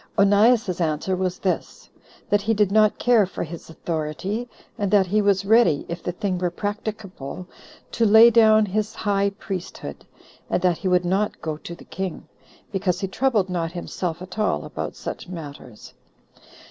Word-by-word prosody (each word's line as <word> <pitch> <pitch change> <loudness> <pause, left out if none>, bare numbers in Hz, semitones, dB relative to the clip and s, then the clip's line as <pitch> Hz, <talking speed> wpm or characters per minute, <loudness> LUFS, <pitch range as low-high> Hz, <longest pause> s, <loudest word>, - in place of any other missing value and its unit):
Onias's 205 -1 +4
answer 160 +3 0
was 185 -1 -2
this: 185 - -3 0.4
That 205 0 +2
he 225 +2 +1
did 205 -2 +2
not 215 0 +4
care 235 -5 +4
for 185 - -5
his 170 0 -9
authority, 170 +9 -4 0.3
and 205 -4 -1
that 200 -1 +4
he 210 +4 +1
was 200 -1 +2
ready, 220 -8 +4
if 170 0 -5
the - - -3
thing 185 0 -2
were 180 -1 0
practicable, 205 -4 -5 0.5
to 230 - 0
lay 225 +2 +8
down 220 -1 +6
his 210 +2 -2
high 200 -1 +1
priesthood; 185 -3 -6 0.5
and - - +1
that 180 -3 +2
he 195 - -3
would 180 -1 +2
not 195 +4 0
go 155 -1 -3
to 170 +2 -9
the - - -15
king, 190 -3 -5 0.4
because 185 -3 -1
he 195 - -1
troubled 215 -1 +1
not 170 -2 -3
himself 175 -1 -4
at 185 +3 -9
all 215 - 0
about - - -5
such - - -7
matters. 145 -9 -10
195 Hz, 170 wpm, -23 LUFS, 175-210 Hz, 0.5 s, lay